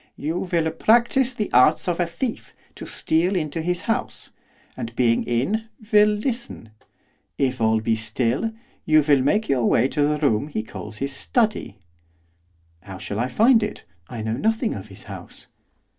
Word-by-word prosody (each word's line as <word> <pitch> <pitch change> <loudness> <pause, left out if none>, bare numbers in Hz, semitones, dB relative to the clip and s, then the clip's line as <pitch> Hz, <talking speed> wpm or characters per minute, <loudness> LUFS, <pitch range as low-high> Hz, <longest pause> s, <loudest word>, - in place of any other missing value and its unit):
'You 160 +4 -3
will 165 -2 +1
practise 240 +7 +2
the 210 -3 -3
arts 130 +8 +4
of 175 -1 -1
a 175 - +1
thief 225 +8 -5 0.2
to - - -9
steal 175 +5 0
into 160 -2 -2
his 175 +2 -1
house; 225 +2 -3 0.4
and, 115 0 -6
being 120 -2 +2
in, 165 - 0 0.3
will 210 0 +7
listen. 215 - -3 0.7
If 130 -3 0
all 110 0 +3
be 110 0 +1
still, 115 - -1 0.3
you 155 -1 +4
will 140 -3 +5
make 210 +12 +1
your 130 -4 +1
way 120 - +3
to 150 - -1
the 150 +1 +2
room 140 -3 +1
he 125 -8 -3
calls 110 0 -8
his 135 +2 -3
study.' 215 - 0 1.0
'How 95 +1 -9
shall 100 +2 -5
I 120 - 0
find 225 - +4
it? 210 - -4 0.3
I 115 -3 -6
know 110 +1 -2
nothing 220 - 0
of - - -8
his - - -12
house. - - -10
150 Hz, 170 wpm, -23 LUFS, -, 1.0 s, will